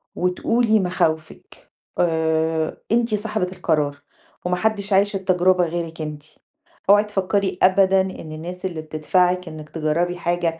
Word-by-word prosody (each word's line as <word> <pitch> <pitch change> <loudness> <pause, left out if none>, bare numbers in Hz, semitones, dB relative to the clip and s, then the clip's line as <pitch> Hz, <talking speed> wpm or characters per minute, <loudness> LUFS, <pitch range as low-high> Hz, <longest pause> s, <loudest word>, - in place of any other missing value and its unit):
وتقولي 220 +5 +1
مخاوفِك 160 -4 -3 0.3
آآ، 160 -1 +1 0.2
أنتِ 230 -2 +2
صاحبة 210 -2 -2
القرار، 150 -5 0 0.5
وماحدش 200 +3 0
عايش 200 +1 +3
التجربة 185 -1 +2
غيرِك 165 -1 -4
أنتِ، 150 -1 -6 0.7
أوعي 205 +1 +7
تفكري 200 -2 -1
أبدًا 190 0 +5
إن 185 -4 -6
الناس 175 +4 -7
اللي 170 -4 -3
بتدفعِك 180 +4 0
إنِك 155 -1 -10
تجربي 165 +3 -1
حاجة 175 -1 -1
180 Hz, 120 wpm, -22 LUFS, 160-195 Hz, 0.7 s, أوعي